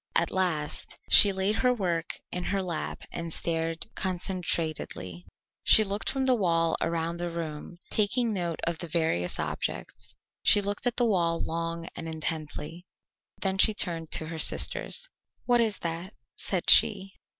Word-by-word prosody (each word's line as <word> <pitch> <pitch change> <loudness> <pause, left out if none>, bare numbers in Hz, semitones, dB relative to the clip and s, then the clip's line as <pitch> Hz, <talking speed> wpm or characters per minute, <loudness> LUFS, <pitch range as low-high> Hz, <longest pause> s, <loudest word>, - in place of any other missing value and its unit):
At - - +2
last 170 -6 -2
she 205 - +10
laid 195 +3 0
her 250 -1 +2
work 175 -8 -2
in 180 0 -2
her 195 -1 -1
lap 170 -4 -4
and 170 -1 -5
stared 165 0 -2
concentratedly. 165 - -3 0.4
She 215 - +7
looked 200 +1 -2
from 270 -1 -1
the 260 - +4
wall 165 -7 +1
around 165 0 -2
the 175 0 -3
room, 165 0 -6
taking 225 +2 +1
note 175 -4 -3
of 170 -1 -2
the 170 - -3
various 160 - 0
objects; - - -5 0.3
she - - +6
looked 205 +4 -2
at 245 - 0
the 245 - +2
wall 170 -6 +1
long 165 0 -4
and 165 - -6
intently. 160 +1 -5 0.6
Then 190 -1 0
she 215 +1 +6
turned 165 -5 -3
to 160 - +4
her 165 -1 -6
sisters. - - 0 0.4
"What 240 -1 +3
is 220 -3 0
that?" 170 +4 -5 0.2
said 185 -3 +2
she. 195 0 +6
170 Hz, 155 wpm, -27 LUFS, 165-200 Hz, 0.6 s, she